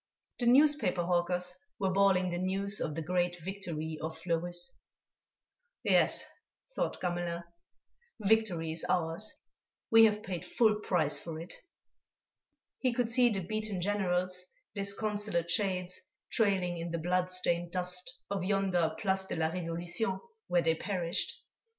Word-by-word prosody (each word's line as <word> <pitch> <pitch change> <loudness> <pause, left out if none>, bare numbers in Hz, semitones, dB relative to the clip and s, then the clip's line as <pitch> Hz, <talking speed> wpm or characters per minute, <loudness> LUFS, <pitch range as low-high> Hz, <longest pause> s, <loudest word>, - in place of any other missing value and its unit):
The 240 - +1
newspaper 290 - +4
hawkers 180 +1 +1 0.2
were 190 -2 +1
bawling 190 -2 +3
the 175 - -2
news 195 +2 0
of 150 - -2
the 165 - -3
great 175 +1 0
victory 160 -4 -4
of 160 0 -4
Fleurus. 175 +4 -2 1.1
"Yes," - - +3 0.5
thought - - -1
Gamelin, 175 -1 -2 0.8
"victory 200 -6 +2
is 160 0 -2
ours. 175 +4 0 0.6
We 225 0 +9
have 210 -1 +1
paid 180 -3 -4
full 215 -3 +3
price 170 -8 +1
for 160 -2 -6
it." 170 - -7 1.3
He 255 -2 +1
could 235 -1 0
see 245 0 +5
the 200 -4 -1
beaten 215 +1 -3
Generals, 185 -2 0 0.3
disconsolate 200 -3 0
shades, 185 -2 0 0.3
trailing 185 -5 +1
in 170 +1 -3
the 170 - -2
blood 180 +2 +1
stained 175 -2 0
dust 180 +4 -1 0.2
of 195 -3 -1
yonder 185 -4 +1
Place 190 0 0
de - - -4
la 160 -1 +1
Révolution 175 +3 -2 0.3
where 175 -1 +3
they 165 0 +4
perished. 175 -1 -1
180 Hz, 135 wpm, -32 LUFS, 170-200 Hz, 1.3 s, We